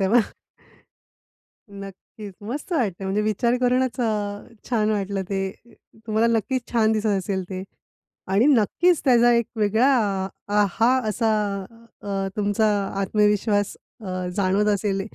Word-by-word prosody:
तेव्हा. 210 Hz, +5 st, +4 dB, 1.6 s
नक्कीच. 195 Hz, +1 st, -10 dB
मस्त 275 Hz, -, -6 dB
वाटतंय 200 Hz, -, -1 dB
म्हणजे 195 Hz, +2 st, 0 dB
विचार 215 Hz, +3 st, +1 dB
करूनच 255 Hz, +1 st, +1 dB
अ, 245 Hz, -, +1 dB, 0.6 s
छान 220 Hz, -3 st, +1 dB
वाटलं 200 Hz, -1 st, -2 dB
ते 195 Hz, -1 st, -1 dB, 0.7 s
तुम्हाला 220 Hz, +1 st, +2 dB
नक्कीच 260 Hz, +4 st, -2 dB
छान 220 Hz, -2 st, +3 dB
दिसत 220 Hz, 0 st, 0 dB
असेल 190 Hz, 0 st, -2 dB
ते 185 Hz, -1 st, -5 dB, 0.7 s
आणि 210 Hz, +7 st, +4 dB
नक्कीच 300 Hz, -, +3 dB
त्याचा 240 Hz, -2 st, +5 dB
एक 235 Hz, -1 st, +2 dB
वेगळा 220 Hz, +5 st, +3 dB, 0.6 s
अ, 205 Hz, 0 st, +3 dB
हा 230 Hz, +6 st, +3 dB, 0.2 s
असा 220 Hz, +1 st, +1 dB, 0.7 s
अ, 195 Hz, -1 st, -2 dB
तुमचा 205 Hz, +1 st, +1 dB, 0.3 s
आत्मविश्वास 210 Hz, 0 st, +1 dB, 0.2 s
अ, 185 Hz, -4 st, -4 dB
जाणवत 200 Hz, +2 st, +1 dB
असेल, 195 Hz, -1 st, -1 dB
210 Hz, 125 wpm, -23 LUFS, 195-235 Hz, 1.6 s, त्याचा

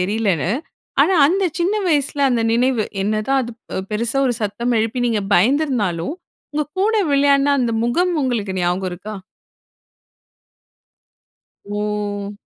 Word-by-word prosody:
தெரியலன்னு. 190 Hz, -3 st, 0 dB, 0.5 s
ஆனா, 385 Hz, -, +3 dB
அந்த 385 Hz, +4 st, +1 dB, 0.2 s
சின்ன 370 Hz, +5 st, +1 dB
வயசுல 285 Hz, -2 st, +1 dB
அந்த 235 Hz, -2 st, +1 dB
நினைவு, 240 Hz, -1 st, +2 dB, 0.2 s
என்னதான் 215 Hz, +6 st, +1 dB
அது 235 Hz, -, -6 dB, 0.4 s
பெருசா 230 Hz, +5 st, -1 dB
ஒரு 245 Hz, -, +1 dB
சத்தம் 235 Hz, +4 st, -1 dB
எழுப்பி 240 Hz, +3 st, -1 dB
நீங்க 220 Hz, -3 st, 0 dB
பயந்திருந்தாலும் 225 Hz, -, +1 dB, 0.4 s
உங்க 300 Hz, -, 0 dB, 0.2 s
கூட 440 Hz, +3 st, +2 dB, 0.2 s
விளையாடுன 280 Hz, 0 st, +4 dB
அந்த 240 Hz, -2 st, 0 dB
முகம் 350 Hz, +10 st, +1 dB
உங்களுக்கு 225 Hz, -7 st, -1 dB
ஞாபகம் 180 Hz, +1 st, 0 dB
இருக்கா? 195 Hz, +5 st, -7 dB, 2.6 s
ஓ! 205 Hz, -1 st, -3 dB
235 Hz, 115 wpm, -20 LUFS, 205-275 Hz, 2.6 s, விளையாடுன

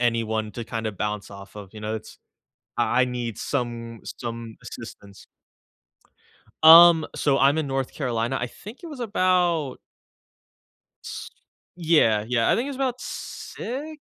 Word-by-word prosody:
anyone 110 Hz, -2 st, 0 dB
to 120 Hz, -, -6 dB
kinda 110 Hz, -1 st, -3 dB
bounce 105 Hz, +1 st, -4 dB
off 100 Hz, +1 st, -12 dB
of, 100 Hz, -2 st, -10 dB
you 110 Hz, -, -10 dB
know, 110 Hz, +1 st, -3 dB
it's 110 Hz, -, -8 dB, 0.6 s
I 125 Hz, -, +3 dB
I 130 Hz, -, +4 dB
need 120 Hz, -3 st, -4 dB
some 120 Hz, -4 st, -3 dB, 0.2 s
some 115 Hz, -2 st, -6 dB
assistance. 100 Hz, 0 st, -11 dB, 1.4 s
Um, 165 Hz, 0 st, +10 dB
so 140 Hz, -2 st, +1 dB
I'm 140 Hz, +3 st, +4 dB
in 155 Hz, -3 st, -1 dB
North 135 Hz, -1 st, -2 dB
Carolina. 120 Hz, -2 st, -1 dB
I 120 Hz, -, -2 dB
think 215 Hz, -, -12 dB
it 340 Hz, -, -6 dB
was 290 Hz, -5 st, -8 dB
about 180 Hz, -, +1 dB, 1.3 s
S -, -, -7 dB, 0.5 s
Yeah, 155 Hz, -12 st, +3 dB
yeah, 120 Hz, -2 st, +2 dB
I -, -, +4 dB
think 240 Hz, -, -1 dB
it -, -, -4 dB
was 280 Hz, -, -5 dB
about 255 Hz, -2 st, -1 dB
6? 295 Hz, +6 st, -6 dB
125 Hz, 150 wpm, -24 LUFS, 110-170 Hz, 1.4 s, Um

